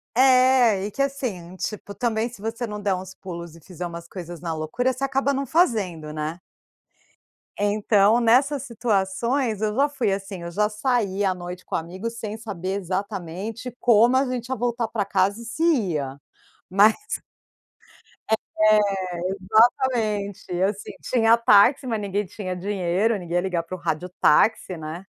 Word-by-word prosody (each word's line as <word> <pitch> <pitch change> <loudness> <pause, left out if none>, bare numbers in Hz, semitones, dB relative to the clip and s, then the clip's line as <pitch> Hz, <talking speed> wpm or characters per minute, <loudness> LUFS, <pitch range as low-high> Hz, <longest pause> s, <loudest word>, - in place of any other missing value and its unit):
É, 255 -5 +5
e 210 - -4
que, 275 - -3
assim, 235 -11 -3
tipo, 205 +1 -5
também 220 +2 -1
se 235 -4 -13
você 225 +3 -3
não 210 -2 -6
der 200 -2 +1
uns 185 0 -7
pulos 170 -4 -8
e - - -14
fizer 180 +1 -7
umas 170 0 -7
coisas 175 -2 -8
na 170 -2 -3
loucura, 160 +12 -1
você 255 +2 -6
acaba 275 +1 +1
não 275 +1 -1
fazendo, 205 - +1
né. 155 +2 -4 1.2
Então, 205 +1 +3
nessas 260 +4 +3
situações 230 0 -1
eu 215 -1 0
já 280 +3 +3
fui 255 -8 -1
assim. 195 -1 -5
Eu 170 - -6
já 210 +4 +1
saí 210 -3 0
à 190 - +2
noite 180 0 -8
com - - -4
amigos 190 +8 -4
sem 215 -1 -5
saber, 195 -3 -4
exatamente, 200 +5 -5
como 235 +1 +5
a 265 +1 +3
gente 250 -2 -3
ia 260 - 0
voltar 235 0 -1
para 215 -2 -1
casa 200 +2 0
e - - -9
se 230 +8 -3
ia, 170 - 0 0.5
mas 205 +4 +6 1.6
É, 215 0 +5 0.8
exatamente, 210 -7 0
assim, 200 +1 -1
tinha 230 -2 +4
táxi 235 +4 +5
mas 225 -3 -1
ninguém 200 0 -1
tinha 185 -1 -5
dinheiro, 195 +3 0
ninguém 175 -2 -6
ia 175 - +3
ligar 180 -3 -1
para 185 - -6
o - - -16
rádio 170 +2 -2
táxi, 190 +3 +3
né. 160 +3 -7
205 Hz, 160 wpm, -24 LUFS, 185-235 Hz, 1.6 s, mas